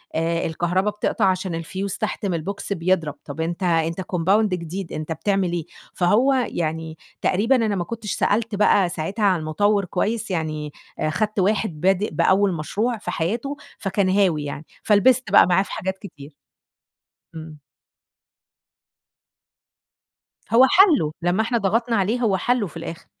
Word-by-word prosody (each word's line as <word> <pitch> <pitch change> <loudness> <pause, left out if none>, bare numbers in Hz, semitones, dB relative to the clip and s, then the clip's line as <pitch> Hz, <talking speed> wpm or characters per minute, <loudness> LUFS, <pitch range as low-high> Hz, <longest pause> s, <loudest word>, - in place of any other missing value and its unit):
آآ، 165 +1 0
الكهربا 175 +5 0
بتقطَع 210 0 -1
عشان 185 -2 0
الفيوز 190 +4 -4
تحت 215 -1 -3
من 190 - 0
البوكس 195 +5 -4
بيضرب، 170 -4 0
طَب 145 +2 -6
أنت 170 +3 -3
أنت 165 0 +1
كمباوند 190 +4 +1
جديد، 180 +2 -6
أنت 155 +1 -5
بتعمل 185 +3 0
إيه؟! 170 -3 -3 0.3
فهو 215 +10 +3
يعني 160 -10 -2 0.2
تقريبًا 225 +8 +2
أنا 220 -4 +1
ما 180 - -1
كُنتش 215 +2 -6
سألت 220 +1 0
بقى 200 -2 +3
ساعتها 190 +6 -2
عن 185 -3 +3
المطوِّر 200 +6 +1
كويس، 210 +4 -2
يعني 155 -3 -3 0.3
أ - - 0
خَدت 210 +6 -1
واحد 190 -4 0
بادئ 195 +2 +2
بأول 195 0 +3
مشروع 210 +9 -2
في 210 - -5
حياته 235 - -2 0.2
فكان 195 -1 0
هاوي 185 -6 +2
يعني، 145 +1 -6 0.2
فلبِست 230 +2 +3
بقى 205 - +7
معاه 180 +2 +3
في - - -12
حاجات 190 -3 -3
كتير. 150 -8 -12 1.0
إمم. 160 -1 -9 2.9
هو 240 +3 +7
حلُّه، 320 - +5
لمّا 175 +5 +1
إحنا 235 +2 0
ضغطنا 230 +3 0
عليه 215 +4 +1
هو 205 -5 +2
حلُّه 240 +2 0
في 165 - -11
الآخر. 165 0 -7
190 Hz, 150 wpm, -22 LUFS, 165-210 Hz, 2.9 s, بقى